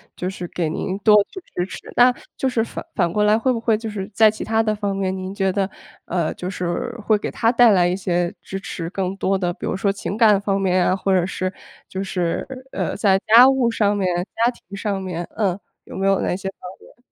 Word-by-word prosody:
就 180 - -3
是 180 -2 -6
给 170 -3 -2
您 185 +4 -3
多 210 0 +6
去 - - -8 0.2
支 180 - 0
持， - - -8 0.2
那 250 +1 +6 0.2
就 265 - 0
是 230 -3 +1
反 - - -7
反 175 -3 +1
过 210 +2 +1
来 210 +1 +4
会 255 +2 +1
不 230 - -2
会 225 -1 +2
就 225 0 -5
是 200 -2 -5
在 220 +1 +6
其 215 - -5
它 225 0 +1
的 215 -1 0
方 205 -1 -2
面， 190 -1 -1
您 190 0 -5
觉 195 -1 0
得， 195 -1 0 0.4
呃， 170 -3 -1
就 180 - -5
是 180 +6 -3
会 215 -1 +4
给 - - -4
他 230 0 +2
带 240 -1 +6
来 180 -3 +4
一 180 - 0
些 175 -2 -1
支 195 - -6
持 170 -3 -5
更 190 0 -3
多 195 0 +1
的 175 -2 -1
比 - - -7
如 - - -2
说 195 0 +1
情 200 +1 -5
感 215 -4 +5
方 200 -1 0
面 185 -2 +2
啊， 185 - +2
或 195 0 0
者 175 - +1
是 185 +1 -3 0.3
就 190 +1 -4
是， 180 -3 -2 0.3
呃， - - -2
在 195 -2 +4
家 235 +4 +9
务 265 -3 +3
上 210 -2 +1
面、 195 -2 0 0.3
家 235 +2 +2
庭 200 -5 -13
上 200 -1 -2
面， 180 -2 -4
呃， 195 -5 0 0.3
有 - - -10
没 195 +1 -2
有 195 -1 +3
哪 - - 0
些 195 0 -4
方 - - -16 0.2
面？ - - -19
195 Hz, 265 characters per minute, -21 LUFS, 185-215 Hz, 0.4 s, 家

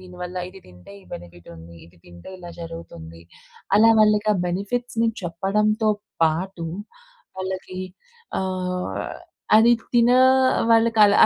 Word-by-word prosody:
దీనివల్ల 180 0 -8
ఇది 190 +1 -14
తింటే, 90 +1 -15
ఈ - - -21
బెనిఫిట్ 85 0 -11
ఉంది. 85 +1 -13
ఇది 85 +2 -20
తింటే 85 - -13
ఇలా 175 -1 -10
జరుగుతుంది. 85 - -9 0.5
అలా 225 +2 +6
వాళ్ళకి 210 0 +3
ఆ - - 0
బెనిఫిట్స్‌ని 230 +6 -1
చెప్పడంతో 210 +5 0 0.3
పాటు, 170 +2 0 0.7
వాళ్ళకి 185 0 -5 0.6
ఆహ్, 180 - -3 0.6
అది 230 +2 +6 0.2
తిన 240 0 +5 0.6
వాళ్ళకి 225 0 +3
అలా 205 0 +4
185 Hz, 115 wpm, -23 LUFS, 165-210 Hz, 0.7 s, అలా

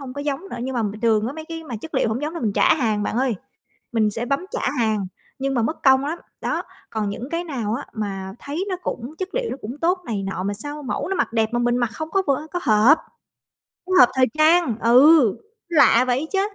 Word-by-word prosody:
hông 260 -2 -7
có 285 - -6
giống 285 0 -2
nữa. - - -5
Nhưng 260 0 -3
mà 235 - 0
bình 210 +1 -4
thường 225 -2 +2
á, 260 - -3
mấy 315 +1 -8
cái 325 0 -7
mà 245 -6 -5
chất 320 - -9
liệu 260 - +2
hổng 225 +5 -2
giống 310 +3 -3
là - - -5
mình 215 -4 0
trả - - +4
hàng 220 -8 0
bạn 210 - -2
ơi, 255 -2 +1 0.6
mình 215 -2 +2
sẽ 230 +4 -4
bấm 275 +4 0
trả - - -3 0.2
hàng, 215 -4 +1 0.3
nhưng 270 0 -1
mà 235 - +1
mất 310 +8 -2
công 265 0 +5
lắm. 325 +4 -3 0.2
Đó, - - -1 0.3
còn 215 -2 -2
những 245 +6 -6
cái 335 +1 -2
nào 235 -9 -3
á 280 - -5
mà 195 -3 -4
thấy 310 +7 -4
nó 370 - -1
cũng 250 +5 -5
chất 375 0 -3
liệu - - -1
nó - - -4
cũng 245 +7 -6
tốt 360 +3 +2
này 210 -4 -2
nọ, 195 -1 -4
mà 200 +1 -2
sao 290 +7 -7
mẫu 260 - -3
nó 385 - -1
mặc 295 - 0
đẹp 220 -1 +2
mà 240 - +1
mình 240 0 +1
mặc 240 -2 0
không 315 0 -6
có 390 - +2
vưa 280 +2 0
có 355 - -2
hợp, 225 +8 +5 0.9
không 370 - -1
hợp 365 -10 +8
thời 255 -1 +5
trang, 310 -6 +4
ừ, 255 0 +6 0.3
lạ 280 -7 +5
vậy 260 +5 0
chớ! 385 - +2
255 Hz, 255 wpm, -22 LUFS, 225-315 Hz, 0.9 s, hợp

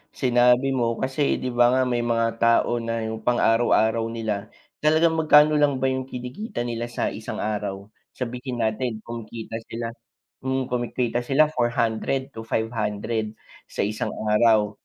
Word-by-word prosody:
sinabi 125 +1 +3
mo 120 -3 0
kasi 135 +3 0
'di 125 - -3
ba 120 +1 +4
nga, 130 - +3
may 125 -1 0
mga 115 -1 +1
tao 115 +1 +3
na 115 -1 -3
yung 110 0 -4
pang-araw-araw 115 -1 +2
nila, 110 -3 -3 0.3
talagang 160 +1 +3
magkano 150 -1 +6
lang 145 -2 +3
ba 130 - +3
yung 130 0 -3
kinikita 125 - -5
nila 120 0 -3
sa 120 - -2
isang - - -5
araw? 105 -1 -4 0.2
Sabihin 125 -1 -4
natin 110 0 -2
kumikita 115 -1 -7
sila, 115 0 -4 0.5
hmm, 130 -1 -2
kumikita 120 0 -1
sila 145 +5 +2
400 120 +2 0
to 115 0 -9
500, 110 -1 -2 0.3
sa - - -2
isang 105 +1 -2 0.2
araw. 105 -2 +4
120 Hz, 145 wpm, -24 LUFS, 115-130 Hz, 0.5 s, magkano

